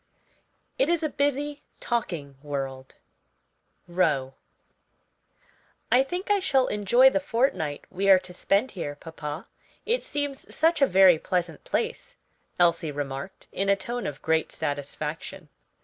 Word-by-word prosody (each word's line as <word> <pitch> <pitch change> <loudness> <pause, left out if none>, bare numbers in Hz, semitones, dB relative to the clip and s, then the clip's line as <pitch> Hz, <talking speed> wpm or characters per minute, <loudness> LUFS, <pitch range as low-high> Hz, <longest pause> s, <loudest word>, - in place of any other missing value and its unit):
It - - +3
is 340 -2 +1
a 310 - +1
busy, 285 +1 -1 0.2
talking 170 - -3
world. 135 -3 -5 0.9
ROWE. 150 -7 +1 1.6
"I 250 - +6
think 355 +9 -3
I 410 - +4
shall 270 -9 +2
enjoy 240 +6 +4
the 290 - +1
fortnight 230 - -1
we 195 +2 0
are 190 - +9
to 180 -1 -7
spend 200 +7 +1
here, 145 -6 -5
papa; 150 +1 -7 0.4
it 470 +3 +1
seems 285 -2 -4
such 325 0 +3
a 275 - +6
very 185 -3 +6
pleasant 175 -4 -2
place," - - -3 0.4
Elsie 170 -2 +3
remarked, 140 +4 -6
in 195 0 -1
a 200 - +5
tone 240 +3 -4
of 145 -1 -7
great 160 0 +1
satisfaction. 150 +4 -5
185 Hz, 135 wpm, -26 LUFS, -, 1.6 s, are